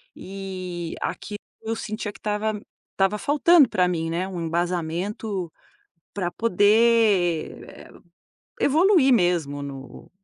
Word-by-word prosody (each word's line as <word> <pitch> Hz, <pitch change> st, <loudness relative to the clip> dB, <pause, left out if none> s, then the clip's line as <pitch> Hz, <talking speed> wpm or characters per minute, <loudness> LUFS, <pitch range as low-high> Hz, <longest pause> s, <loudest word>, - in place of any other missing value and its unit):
e 185 Hz, -3 st, -6 dB
aquilo, 205 Hz, -, -4 dB, 0.2 s
eu 225 Hz, 0 st, -3 dB
sentia 215 Hz, -1 st, -5 dB
que -, -, -17 dB
estava 210 Hz, 0 st, -2 dB, 0.3 s
estava 195 Hz, +2 st, +1 dB
faltando 295 Hz, +1 st, +4 dB
pra 180 Hz, -1 st, +2 dB
mim, 165 Hz, -2 st, -2 dB
né, 175 Hz, +3 st, -2 dB
um 180 Hz, -3 st, -5 dB
embasamento 175 Hz, +3 st, -3 dB, 0.6 s
pra 185 Hz, -3 st, -2 dB
poder, 210 Hz, -4 st, +2 dB
eh, -, -, -13 dB, 0.7 s
evoluir 320 Hz, -2 st, +4 dB
mesmo 170 Hz, -8 st, 0 dB
no 135 Hz, -2 st, -9 dB
195 Hz, 110 wpm, -24 LUFS, 175-220 Hz, 0.7 s, faltando